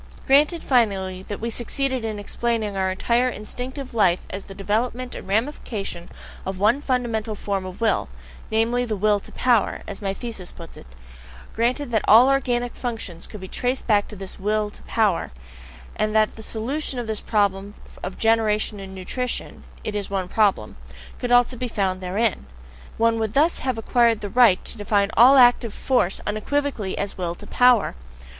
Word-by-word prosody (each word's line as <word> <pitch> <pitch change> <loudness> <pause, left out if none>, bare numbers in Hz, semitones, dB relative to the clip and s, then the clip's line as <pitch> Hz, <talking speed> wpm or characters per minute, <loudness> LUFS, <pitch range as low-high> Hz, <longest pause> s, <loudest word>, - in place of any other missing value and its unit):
Granted, 300 +5 +4
finally, 195 -7 +1
that 205 - -5
we 230 +1 -3
succeeded 260 +2 -2
in 220 -2 -3
explaining 215 0 -2
our 190 -1 0
entire 235 +6 +1
instinctive 250 +5 -7
life 190 -6 +3
as 195 - -6
the 195 - -10
development 240 +5 -2
and - - -8
ramification 205 -5 -3 0.3
of 190 0 -4
one 215 +8 +3
fundamental 230 -5 -1
form 195 -2 -2
of 185 0 -9
will 220 - +1 0.4
namely, 230 +3 +1
the 225 -3 -2
Will 205 +1 +2
to - - -15
Power, 240 -4 +1
as 200 - -6
my 195 -1 -1
thesis 195 -3 -6
puts 165 -1 -12
it; 60 - -13 0.7
granted 245 +4 0
that 220 -2 +2
all 235 +5 +8
organic 245 -3 0
functions 225 -9 -5
could 210 - -9
be 190 - -8
traced 250 +6 -2
back 205 -3 +3
to 210 - -10
this 195 0 -7
Will 210 +1 0
to - - -18
Power, 210 -6 +1 0.7
and 215 0 -1
that 215 -1 +3
the 220 - -10
solution 255 +6 -3
of 240 - -3
the 220 -1 -3
problem 200 -1 0 0.3
of 185 +1 -6
generation 220 -2 +1
and 190 0 -9
nutrition 250 +7 -4 0.2
it 215 - -4
is 205 -1 -3
one 190 -2 -2
problem 205 +1 +1 0.4
could 245 -1 -3
also 245 +1 +4
be 250 +1 -3
found 190 -4 -1
therein: 190 - -1 0.5
one 230 0 +2
would 220 +1 -2
thus 315 +5 +3
have 255 -3 -2
acquired 230 0 +2
the 205 - -4
right 235 -5 +4
to 230 - -5
define 205 0 +1
ALL 255 +4 +8
active 245 -3 +5
force 245 -8 +1
unequivocally 215 -1 -2
as 200 -1 -4
WILL 175 -1 -2
TO - - -13
POWER. 245 -3 +4
220 Hz, 175 wpm, -23 LUFS, 200-245 Hz, 0.7 s, all